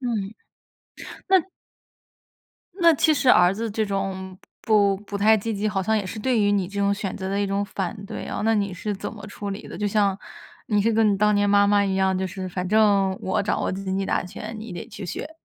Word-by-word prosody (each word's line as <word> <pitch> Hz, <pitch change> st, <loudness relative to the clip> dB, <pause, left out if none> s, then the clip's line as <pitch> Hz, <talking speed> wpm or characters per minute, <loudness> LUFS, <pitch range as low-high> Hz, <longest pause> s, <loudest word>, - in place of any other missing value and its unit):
嗯。 220 Hz, -5 st, -3 dB, 0.9 s
那 380 Hz, -1 st, +6 dB, 1.4 s
那 335 Hz, -1 st, +7 dB
其 310 Hz, +2 st, +3 dB
实 265 Hz, -, +1 dB
儿 180 Hz, -4 st, +6 dB
子 225 Hz, +1 st, -3 dB
这 220 Hz, +1 st, -1 dB
种 190 Hz, -1 st, -4 dB, 0.3 s
不 200 Hz, -3 st, +3 dB
不 205 Hz, 0 st, -6 dB
太 220 Hz, +2 st, +5 dB
积 225 Hz, +2 st, -3 dB
极， 210 Hz, +2 st, -1 dB
好 195 Hz, -2 st, -1 dB
像 220 Hz, +3 st, +1 dB
也 205 Hz, -, -1 dB
是 215 Hz, -, -6 dB
对 240 Hz, 0 st, +1 dB
于 205 Hz, -, +3 dB
你 200 Hz, -3 st, +1 dB
这 200 Hz, +2 st, -4 dB
种 200 Hz, 0 st, +2 dB
选 200 Hz, -2 st, -3 dB
择 190 Hz, 0 st, -4 dB
的 195 Hz, -, -1 dB
一 200 Hz, -, 0 dB
种 200 Hz, +1 st, -1 dB
反 195 Hz, -1 st, -4 dB
对 -, -, -6 dB
啊， -, -, -4 dB
那 225 Hz, 0 st, +3 dB
你 200 Hz, -2 st, 0 dB
是 205 Hz, +3 st, -3 dB
怎 195 Hz, -, -6 dB
么 205 Hz, -3 st, -10 dB
处 205 Hz, 0 st, -6 dB
理 195 Hz, -, -6 dB
的？ -, -, -8 dB
就 210 Hz, -, -1 dB
像 200 Hz, -1 st, +1 dB, 0.5 s
你 210 Hz, -2 st, +2 dB
是 230 Hz, +1 st, +2 dB
跟 215 Hz, -2 st, +3 dB
你 -, -, 0 dB
当 210 Hz, +1 st, +3 dB
年 205 Hz, 0 st, +2 dB
妈 200 Hz, 0 st, +5 dB
妈 205 Hz, 0 st, +3 dB
一 195 Hz, -, -1 dB
样， 190 Hz, 0 st, +2 dB
就 190 Hz, 0 st, -1 dB
是 185 Hz, 0 st, -6 dB
反 180 Hz, 0 st, -4 dB
正 200 Hz, -3 st, +3 dB
我 190 Hz, +1 st, -1 dB
掌 205 Hz, -, -1 dB
握 -, -, 0 dB
经 190 Hz, 0 st, -3 dB
济 195 Hz, -, -1 dB
大 -, -, 0 dB
权， 215 Hz, +5 st, -8 dB
你 220 Hz, -2 st, -8 dB
得 175 Hz, -, -7 dB
去 195 Hz, -, -8 dB
学。 310 Hz, -, -6 dB
200 Hz, 255 characters per minute, -24 LUFS, 195-215 Hz, 1.4 s, 那